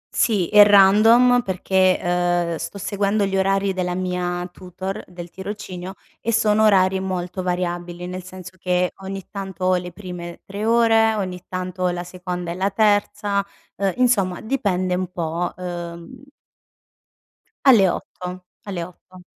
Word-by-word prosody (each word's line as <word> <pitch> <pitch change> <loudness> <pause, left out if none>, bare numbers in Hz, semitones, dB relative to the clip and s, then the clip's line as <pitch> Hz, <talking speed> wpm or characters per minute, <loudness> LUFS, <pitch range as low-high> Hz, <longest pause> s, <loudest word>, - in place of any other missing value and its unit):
Sì, 205 -7 +2
è 210 -1 +8
random 220 +5 +6
perché, 190 -1 +1
uhm, 175 -1 0
sto 200 - -6
seguendo 200 +1 0
gli 195 0 -2
orari 195 0 +1
della 180 -1 -2
mia 180 -1 -2
tutor 185 +1 -6
del 175 -1 -10
tirocinio, 190 -2 -7 0.3
e 230 - -1
sono 215 -1 +3
orari 190 -2 +4
molto 185 -1 -3
variabili, 175 -1 -3
nel 185 +1 -5
senso 185 0 -10
che 180 0 0
ogni 195 0 -7
tanto 190 -3 -5
ho 185 0 +4
le 180 0 -4
prime 175 -2 -8
3 200 +2 -5
ore, 225 -1 +4
ogni 185 -3 -4
tanto 185 0 -5
ho 180 - +3
la 175 0 -3
seconda 180 -1 -5
e - - -2
la 190 +2 0
terza, 205 -1 +1 0.3
uhm, 195 -2 0
insomma 205 -8 +2
dipende 195 -7 -1
un 185 0 -1
pò, 170 0 -2
uhm 175 +4 -7 1.4
Alle 210 -8 +7
8.00 180 +1 -6 0.2
alle 185 -4 -4
8:00. 180 0 -16
185 Hz, 145 wpm, -22 LUFS, 180-200 Hz, 1.4 s, è